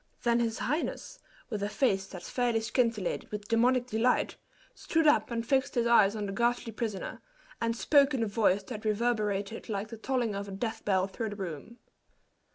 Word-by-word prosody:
Then 235 0 +3
his 230 0 0
highness, 330 - -3 0.3
with 210 -2 -2
a 205 - -1
face 195 -6 +1
that 180 -3 -9
fairly 245 -2 0
scintillated 225 -3 -1
with 210 0 -5
demoniac 245 +2 +3
delight, 240 +1 +1 0.4
stood 325 -1 0
up 295 - +4
and 230 -1 -2
fixed 270 +2 +1
his 240 -1 +2
eyes 220 -3 +5
on 210 -1 -3
the 195 - -4
ghastly 235 +2 0
prisoner, 220 -3 -4 0.4
and 230 0 0
spoke 280 +1 +4
in 235 - 0
a - - 0
voice 200 -2 +2
that 215 +1 -7
reverberated 215 -2 -1
like 205 0 -3
the 230 - -8
tolling 240 -2 -1
of 200 0 -4
a - - -7
death 220 +3 -4
bell 190 -2 +2
through 220 +3 -4
the 205 - -6
room. 190 +4 -7
225 Hz, 185 wpm, -30 LUFS, 205-240 Hz, 0.4 s, eyes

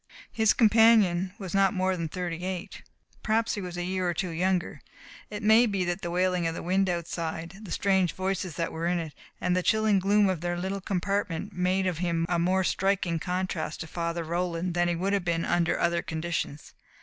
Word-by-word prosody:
His 220 -1 +3
companion 215 -5 +4
was 190 -6 -7
not 195 0 +3
more 185 0 +1
than 165 -2 -3
thirty 175 0 -4
eight. 185 -2 -5 0.4
Perhaps 225 +1 +1
he 205 - -3
was 180 -1 -6
a 175 - -2
year 185 0 -1
or 175 - -2
two 180 +1 -2
younger. 180 -2 -1 0.5
It 210 0 -6
may 220 +3 +6
be 195 -3 -1
that 175 +2 -2
the 170 - -3
wailing 180 -1 +1
of 165 - -3
the - - -6
wind 190 +2 +1
outside, 170 +1 -4
the 210 - -10
strange 190 -4 +1
voices 185 -3 -2
that 165 +1 -2
were 165 +1 -3
in 175 0 +1
it 160 -3 -5 0.3
and 180 0 +1
the 185 - +2
chilling 215 +1 +3
gloom 200 +2 +3
of 185 -4 -1
their 175 0 -2
little 190 +2 -3
compartment 195 0 -2
made 185 +1 +1
of 180 -3 -1
him 170 -2 0
a 175 -1 +1
more 185 +2 +2
striking 185 -3 0
contrast 185 +4 -3
to - - -4
Father 170 +1 -3
Roland 170 +1 -2
than 175 0 +2
he 175 - 0
would 190 +4 -1
have 200 -2 +1
been 170 -1 0
under 175 -1 +1
other 170 0 +1
conditions. 160 -2 -4
180 Hz, 210 wpm, -27 LUFS, 170-195 Hz, 0.5 s, may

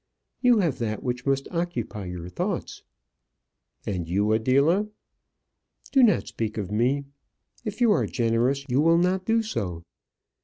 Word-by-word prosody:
You 245 -2 +5
have 155 -8 -1
that 110 -2 -3
which 125 +1 -3
must 135 0 +1
occupy 145 - -3
your 90 -1 -6
thoughts." 90 - -4 1.0
"And 90 -5 -3
you, 100 +4 +1
Adela 140 - +3 0.5
?" - - -27
"Do 270 - +5
not 235 -4 +4
speak 110 -1 -4
of 100 -2 -4
me. 130 +6 +1 0.6
If 210 +2 -5
you 235 -3 +5
are - - +2
generous, 120 +3 0
you 130 +2 +2
will 165 +2 +5
not 185 +2 +1
do 225 0 +2
so. 90 - -4
130 Hz, 150 wpm, -25 LUFS, 110-175 Hz, 1.0 s, You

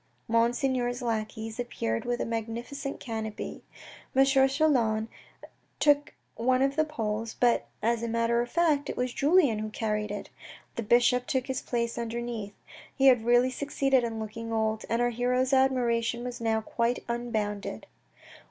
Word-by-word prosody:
Monseigneur's 245 +2 +1
lackeys 220 0 -3
appeared 115 - -2
with 245 0 -1
a - - -1
magnificent 235 +5 -4
canopy. 220 -3 -5 0.5
M. 270 +1 +6
Chelan 265 -5 +3 0.7
took 290 0 +3 0.2
one 255 +2 +2
of 275 0 +1
the 310 - +3
poles, 225 -7 -3
but 240 -1 +3 0.2
as 230 +1 +1
a 235 - -2
matter 230 +1 +1
of 240 - -4
fact 305 -4 +2
it - - -4
was 250 0 -1
Julien 285 -7 +3
who 215 0 -3
carried 210 -1 -2
it. 205 0 -6 0.4
The - - -2
bishop 245 +2 +3
took 260 -2 0
his 265 -1 -3
place 235 -1 -2
under 235 0 -3
neath. 225 -4 -5 0.4
He 270 - +2
had 245 -3 +3
really 245 +2 +4
succeeded 270 -1 +1
in 225 -1 -3
looking 230 +1 -6
old; 220 -1 0
and 230 +1 +1
our 240 - +1
hero's 250 +3 +1
admiration 240 -3 +2
was 245 -1 -6
now 220 -1 +1
quite 235 +2 -1
unbounded. 220 -4 -3
240 Hz, 155 wpm, -28 LUFS, 225-260 Hz, 0.7 s, M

